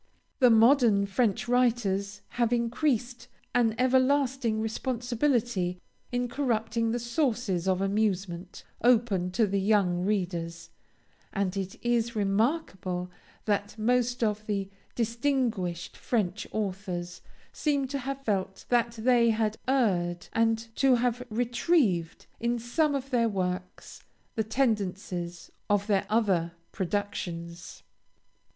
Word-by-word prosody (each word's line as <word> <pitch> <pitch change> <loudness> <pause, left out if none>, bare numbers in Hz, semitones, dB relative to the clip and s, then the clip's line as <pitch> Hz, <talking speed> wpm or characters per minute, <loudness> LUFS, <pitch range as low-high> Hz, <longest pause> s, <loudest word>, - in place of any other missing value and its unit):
The 250 -3 +6
modern 225 -3 +5
French 205 +2 0
writers 210 -5 +1
have 235 -1 0
increased 240 0 0 0.3
an 230 -3 +2
everlasting 260 -2 +2
responsibility 235 -4 -1 0.3
in 245 0 0
corrupting 230 -3 0
the 235 - 0
sources 235 - -1
of 190 0 +2
amusement, 195 -3 -1 0.2
open 225 -7 +3
to 225 +2 +3
the 200 -1 0
young 190 -3 +2
readers, 175 -4 -2 0.6
and 195 -2 -1
it 195 -1 -3
is 235 -1 +1
remarkable 195 - -1 0.3
that 205 0 -1
most 245 +2 +1
of 215 -1 -1
the 200 -2 -2 0.2
distinguished 230 -7 -1
French 210 -4 -1
authors 185 -4 -4 0.3
seem 285 -3 0
to 280 0 -2
have 275 +1 -5
felt 190 -2 -2
that 240 -1 +2
they 235 0 +3
had 220 -1 +1
erred, 180 -10 +1
and 225 0 0
to 270 -2 +5
have 245 0 0
retrieved 235 - +1
in 235 +1 0
some 285 +6 +1
of 275 0 -4
their 235 -2 +3
works 180 -2 -4 0.3
the 220 - 0
tendencies 195 -7 -2 0.2
of 205 -1 +2
their 200 -2 +1
other 190 -7 +1 0.2
productions. 175 -3 -4
220 Hz, 115 wpm, -28 LUFS, 195-245 Hz, 0.6 s, The